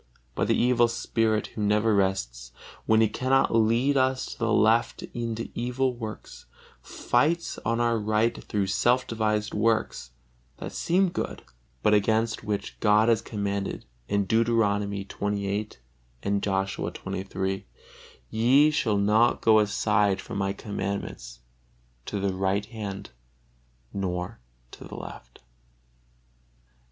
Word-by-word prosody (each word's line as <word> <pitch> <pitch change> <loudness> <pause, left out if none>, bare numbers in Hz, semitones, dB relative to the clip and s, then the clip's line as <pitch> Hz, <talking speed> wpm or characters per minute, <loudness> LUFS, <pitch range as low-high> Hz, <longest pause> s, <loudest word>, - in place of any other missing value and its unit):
But - - -1
the - - +2
evil 120 -1 +4
spirit, 115 -2 0
who 110 - -5
never 105 +2 +2
rests, 65 -11 -1 0.4
when 110 0 +5
he 110 - +5
cannot 130 +5 +1
lead 115 +5 +3
us 130 0 +1
to - - -9
the 115 0 0
left 110 +3 +3
into 115 -1 -4
evil 125 +2 -1
works, 110 -3 -8 0.3
fights 160 +8 0
on 115 +1 -1
our 115 -1 +2
right 110 +2 0
through 100 -2 -1
self 120 +7 +2
devised 105 -2 -1
works 110 - 0 0.5
that - - -6
seem 185 +2 +1
good, - - -4 0.4
but 105 - +4
against 110 +2 +1
which 105 -1 -4
God 105 +1 +4
has 115 -2 +3
commanded, 100 -3 -3 0.2
Deuteronomy 100 -1 +1
xxviii, 100 +1 -2 0.5
and 100 0 0
Joshua 95 -1 -1
xxiii, 95 -1 -4 0.6
"Ye 130 +7 +4
shall 120 -9 +1
not 105 +4 +3
go 110 -1 +5
aside 105 -1 +2
from 100 - -5
My 95 0 0
commandments 100 - -5 0.7
to 100 - -3
the 100 -1 0
right 95 +2 0
hand 105 -4 -7 0.8
or 90 +2 -3 0.3
to - - -11
the - - -9
left." - - -10
105 Hz, 125 wpm, -26 LUFS, 100-115 Hz, 0.8 s, when